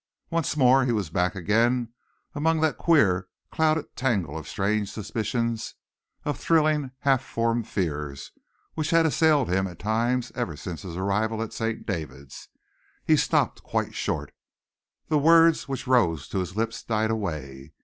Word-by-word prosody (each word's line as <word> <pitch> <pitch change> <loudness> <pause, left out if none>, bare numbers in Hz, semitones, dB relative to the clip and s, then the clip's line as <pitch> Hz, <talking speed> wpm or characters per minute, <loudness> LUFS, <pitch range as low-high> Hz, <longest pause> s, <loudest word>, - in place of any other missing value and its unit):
Once 165 -2 -1
more 130 -1 +5
he 125 - +1
was 105 -9 -2
back 90 +3 0
again 115 +6 +1 0.4
among 160 +2 +1
that 155 -1 +1
queer, 95 - +3 0.2
clouded 160 0 0
tangle 100 - -1
of 80 - -6
strange 100 +1 -1
suspicions, 110 +2 -3 0.5
of 145 - -2
thrilling, 155 -4 +2
half 135 -2 +2
formed 115 -2 -1
fears, 75 -7 -3 0.4
which 155 0 -2
had 165 -1 +4
assailed 155 -2 +3
him 95 +2 +1
at 90 -3 -10
times 115 +4 0
ever 95 -11 -3
since 85 0 -6
his 90 -3 -7
arrival 105 +4 0
at 115 - -7
St, 115 0 -3
David's. 70 - -6 0.6
He - - +5
stopped - - +1
quite - - -2
short. - - -3 0.7
The 155 -2 +2
words 165 +1 +5
which 135 -1 -4
rose 85 - +2
to 95 - -2
his 90 0 -4
lips 115 0 -2
died 110 -1 0
away. 75 -9 -5
115 Hz, 150 wpm, -26 LUFS, 90-135 Hz, 0.7 s, more